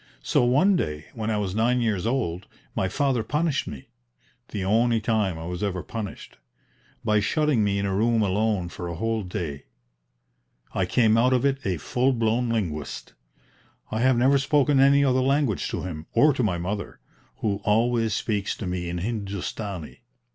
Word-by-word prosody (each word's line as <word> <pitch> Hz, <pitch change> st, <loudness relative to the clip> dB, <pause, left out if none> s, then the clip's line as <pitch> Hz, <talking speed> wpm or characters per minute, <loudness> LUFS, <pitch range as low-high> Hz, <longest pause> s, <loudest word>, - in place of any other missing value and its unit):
So -, -, +2 dB
one 145 Hz, +11 st, +4 dB
day 75 Hz, -, -2 dB
when 110 Hz, -2 st, -3 dB
I 110 Hz, -, 0 dB
was 100 Hz, -3 st, -2 dB
nine 120 Hz, +4 st, +2 dB
years 110 Hz, -4 st, 0 dB
old 100 Hz, -8 st, -2 dB, 0.3 s
my 95 Hz, -, 0 dB
father 135 Hz, +2 st, +1 dB
punished 150 Hz, +5 st, -1 dB
me 65 Hz, -, -8 dB, 0.6 s
the 100 Hz, -3 st, -4 dB
only 115 Hz, +3 st, +3 dB
time 105 Hz, -5 st, 0 dB
I 80 Hz, -, -7 dB
was 90 Hz, 0 st, -5 dB
ever 95 Hz, -4 st, -2 dB
punished 110 Hz, -4 st, -7 dB, 0.7 s
by 105 Hz, 0 st, +3 dB
shutting 145 Hz, +2 st, +1 dB
me 100 Hz, -1 st, +1 dB
in 100 Hz, -, -1 dB
a 100 Hz, -, -1 dB
room 110 Hz, +2 st, +2 dB
alone 100 Hz, -1 st, 0 dB
for 90 Hz, 0 st, -6 dB
a 85 Hz, -, -4 dB
whole 115 Hz, +4 st, -1 dB
day. 85 Hz, -7 st, -5 dB, 1.1 s
I -, -, 0 dB
came 110 Hz, -2 st, +3 dB
out 125 Hz, +2 st, +4 dB
of 125 Hz, +1 st, +2 dB
it 135 Hz, -1 st, 0 dB
a 90 Hz, -3 st, 0 dB
full 125 Hz, -, +1 dB
blown 115 Hz, +1 st, +1 dB
linguist. 85 Hz, -10 st, -3 dB, 0.8 s
I 110 Hz, -, -1 dB
have 130 Hz, +1 st, +3 dB
never 135 Hz, +3 st, +4 dB
spoken 140 Hz, 0 st, +3 dB
any 140 Hz, +1 st, +5 dB
other 130 Hz, -1 st, +3 dB
language 135 Hz, -5 st, +1 dB
to -, -, -3 dB
him, 80 Hz, -3 st, -6 dB
or 150 Hz, +1 st, +5 dB
to 130 Hz, -, -1 dB
my 100 Hz, -7 st, +1 dB
mother, 100 Hz, +4 st, -4 dB, 0.4 s
who 100 Hz, -2 st, -1 dB
always 115 Hz, 0 st, +2 dB
speaks 105 Hz, -3 st, -1 dB
to 105 Hz, -, -5 dB
me 90 Hz, -1 st, -3 dB
in 85 Hz, -, -3 dB
Hindustani. 100 Hz, -3 st, -4 dB
110 Hz, 175 wpm, -25 LUFS, 95-125 Hz, 1.1 s, any